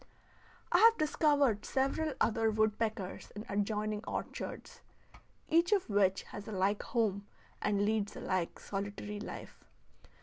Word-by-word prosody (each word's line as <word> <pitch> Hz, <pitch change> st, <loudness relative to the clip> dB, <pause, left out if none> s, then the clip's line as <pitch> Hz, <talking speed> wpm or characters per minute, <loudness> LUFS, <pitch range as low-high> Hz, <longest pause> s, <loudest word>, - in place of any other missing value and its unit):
I -, -, +5 dB
have 455 Hz, 0 st, +7 dB
discovered 290 Hz, -7 st, +2 dB
several 275 Hz, +3 st, 0 dB
other 225 Hz, 0 st, +2 dB
woodpeckers 215 Hz, -2 st, -1 dB
in 210 Hz, +2 st, -6 dB
adjoining 210 Hz, +1 st, -1 dB
orchards, -, -, -5 dB, 0.7 s
each 335 Hz, +4 st, +3 dB
of 390 Hz, -, +2 dB
which 195 Hz, -2 st, +3 dB
has 205 Hz, -, -9 dB
a -, -, -5 dB
like 200 Hz, +1 st, +1 dB
home 205 Hz, -4 st, -1 dB, 0.3 s
and 205 Hz, 0 st, +1 dB
leads 210 Hz, -1 st, 0 dB
a -, -, -7 dB
like 185 Hz, -2 st, -1 dB
solitary 205 Hz, +1 st, -5 dB
life. -, -, -8 dB
215 Hz, 130 wpm, -33 LUFS, 200-250 Hz, 0.7 s, have